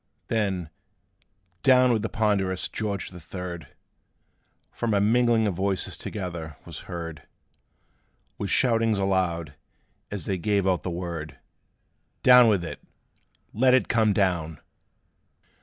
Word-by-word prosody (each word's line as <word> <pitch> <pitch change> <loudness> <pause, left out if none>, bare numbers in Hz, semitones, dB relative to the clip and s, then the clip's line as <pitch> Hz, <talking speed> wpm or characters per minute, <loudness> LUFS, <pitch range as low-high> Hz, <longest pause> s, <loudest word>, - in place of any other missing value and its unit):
Then, 95 -7 -1 0.9
"Down 125 -1 +5
with 110 - 0
the 115 - -3
ponderous 100 -4 0
George 100 -3 -3
the 90 - -10
Third!" 85 -2 -7 1.0
From 115 -3 -1
a - - +3
mingling 115 +1 +3
of 100 - 0
voices 95 +1 -2
together, 85 -6 -6
was - - -8
heard, 80 -3 -6 1.2
With 100 - -3
shoutings 115 -4 +3
aloud, 90 -5 0 0.6
as 100 -5 -5
they 95 -2 -2
gave 100 +1 +1
out 90 -4 +1
the - - -4
word, 85 -3 -5 0.9
"Down 125 -1 +8
with 100 -5 +2
it! - - -7 0.7
let 130 +3 +4
it 130 - +1
come 110 -2 +3
down! 85 -5 0
95 Hz, 125 wpm, -26 LUFS, 85-110 Hz, 1.2 s, Down